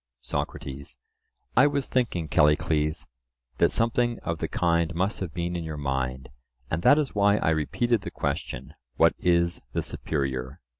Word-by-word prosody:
SOCRATES: 70 -1 -5 0.6
I 135 +4 +7
was 140 -2 0
thinking, 110 -11 0
Callicles, 75 0 +2 0.5
that - - +4
something 120 +1 +1
of 85 -1 -3
the - - -1
kind 85 -1 +1
must 95 +5 0
have 95 -4 -4
been 85 +2 -3
in 85 - -3
your 80 -1 -5
mind, 65 -2 -2 0.4
and 80 - 0
that 145 - +6
is 150 -3 0
why 100 0 +4
I 80 - +1
repeated 110 - +1
the - - -5
question,—What 65 +5 -1
is 85 -1 +2
the - - -1
superior? 65 -3 -3
85 Hz, 150 wpm, -26 LUFS, 75-100 Hz, 0.6 s, I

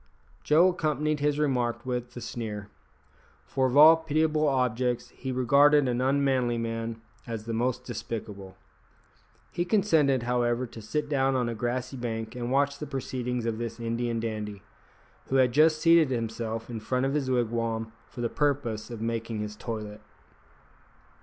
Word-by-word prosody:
Joe 165 +5 +5
accompanied 155 -3 -1
his 145 0 +1
remark 125 -5 0
with 125 -1 -4
a - - -6
sneer, 105 -4 -5 0.8
for 130 -1 +1
of 130 +2 0
all 155 +2 +10
pitiable 155 -1 +1
objects 125 -2 0
he 130 - -6
regarded 140 +3 +4
an 125 0 0
unmanly 130 -3 +1
man 115 0 -3 0.3
as 115 -2 -5
the 115 - -3
most 125 +2 -1
despicable. 105 -5 -6 0.9
He 175 - -1
consented, 160 - +2
however, 120 0 0
to 115 -1 -10
sit 150 +8 -2
down 135 -2 +1
on 125 -2 +1
a 120 - -2
grassy 125 +3 -3
bank 115 -1 -4
and 120 0 -3
watch 140 +1 +1
the 150 - -5
proceedings 125 -3 -3
of 115 -1 -2
this 115 0 -5
Indian 115 0 -2
dandy, 105 -3 -4 0.6
who 135 - -1
had 130 -2 +4
just 155 +4 +4
seated 165 -2 +5
himself 115 -2 -3
in 115 -2 -5
front 125 +4 -1
of 135 - 0
his 140 -3 -1
wigwam 115 -2 -1 0.2
for 120 - -8
the 120 - +1
purpose 135 -6 -1
of 115 -2 -6
making 115 -1 -2
his 105 0 -5
toilet. 105 -1 -6
125 Hz, 160 wpm, -28 LUFS, 115-140 Hz, 0.9 s, all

